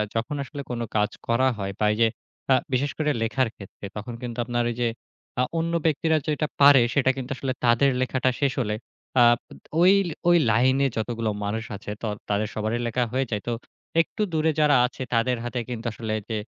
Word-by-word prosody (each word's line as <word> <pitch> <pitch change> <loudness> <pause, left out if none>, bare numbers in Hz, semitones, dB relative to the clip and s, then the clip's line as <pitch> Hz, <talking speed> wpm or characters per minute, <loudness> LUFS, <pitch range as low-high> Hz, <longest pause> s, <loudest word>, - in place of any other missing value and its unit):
যখন 120 +6 -1
আসলে 140 +1 -7
কোন 120 -1 -3 0.2
কাজ 105 0 +2 0.2
করা 120 +3 +3
হয় 100 -1 -3
বা 105 - +2
এই - - -4
যে, 115 - +6 0.4
আ - - +8 0.2
বিশেষ 140 +3 +1
করে 155 -1 0
লেখার 120 +2 +1
ক্ষেত্রে, 100 0 -11
তখন 110 +3 -6
কিন্তু 120 -1 -5
আপনার 120 0 0
ওই 120 - -3
যে, 120 - +3 0.5
আ - - +4
অন্য 165 +1 -1
ব্যক্তিরা 160 +1 +2
যেটা 150 0 0
পারে 140 -2 +8
সেটা 130 -2 +3
কিন্তু 130 +1 -5
আসলে 130 0 -2
তাদের 120 +4 +4
লেখাটা 130 0 +1
শেষ 140 -3 +2
হলে 105 -3 -1 0.4
আ - - +7 0.3
বা - - -14 0.3
ওই, 185 +2 +7 0.4
ওই, 175 - +7
লাইনে 130 +5 +3
যতগুলো 115 0 -1 0.2
মানুষ 110 +2 -2
আছে 105 - -7
তর 105 -2 -1
তাদের 105 +1 +1
সবারই 110 +2 -1
লেখা 125 +2 0
হয়ে 135 +1 +1
যায়। 105 -1 -1
তো - - 0 0.5
একটু 215 - -5
দূরে 160 0 +2
যারা 150 -1 +5
আছে 125 - -6
তাদের 120 +2 +2
হাতে 120 +1 -3
কিন্তু 120 -1 -5
আসলে 110 0 -4 0.2
যে 110 - -1
125 Hz, 200 wpm, -25 LUFS, 115-140 Hz, 0.5 s, আ